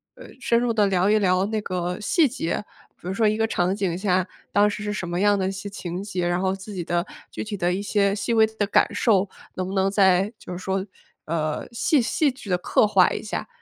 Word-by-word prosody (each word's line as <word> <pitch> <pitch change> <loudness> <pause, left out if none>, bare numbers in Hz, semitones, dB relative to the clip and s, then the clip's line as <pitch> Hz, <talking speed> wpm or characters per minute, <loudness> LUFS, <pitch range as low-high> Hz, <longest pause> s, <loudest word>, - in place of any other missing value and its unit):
呃， - - -12
深 235 - +2
入 245 -1 +1
地 215 -2 +3
聊 190 0 +2
一 215 +1 +4
聊 185 -1 +2
那 215 0 -1
个 180 -1 -3
细 310 - +3
节， 210 - -3 0.4
比 - - -10
如 185 - -2
说 220 +3 +1
一 215 +1 +1
个 225 - +1
场 185 -4 0
景 190 -4 -1
下， 185 -1 +1 0.2
当 205 +1 +4
时 210 0 -5
是 210 - -2
什 195 -4 -4
么 175 +1 -2
样 205 0 +4
的 190 - 0
一 - - -1
些 195 +1 -6
情 180 -2 -5
节， 185 -4 -2
然 175 +1 0
后 190 0 +1
自 195 +2 -8
己 180 -3 -3
的 175 +1 -1 0.3
具 - - -6
体 210 -1 -5
的 175 -2 0
一 195 - -2
些 200 -1 +1
细 225 +3 -2
微 220 -1 +6
的 220 -1 -2
感 205 - +3
受， 200 -4 +2 0.2
能 185 - -3
不 190 - -5
能 195 0 +2
再 195 +1 +3
就 - - -10
是 180 - -4
说， 190 +1 -2 0.4
呃， 155 -1 -2
戏 260 +4 +2
戏 285 +6 +1
剧 255 -6 -11
地 180 - +2
刻 180 - +2
画 190 -3 +5
一 - - -3
下。 215 - -4
195 Hz, 270 characters per minute, -24 LUFS, 180-210 Hz, 0.4 s, 微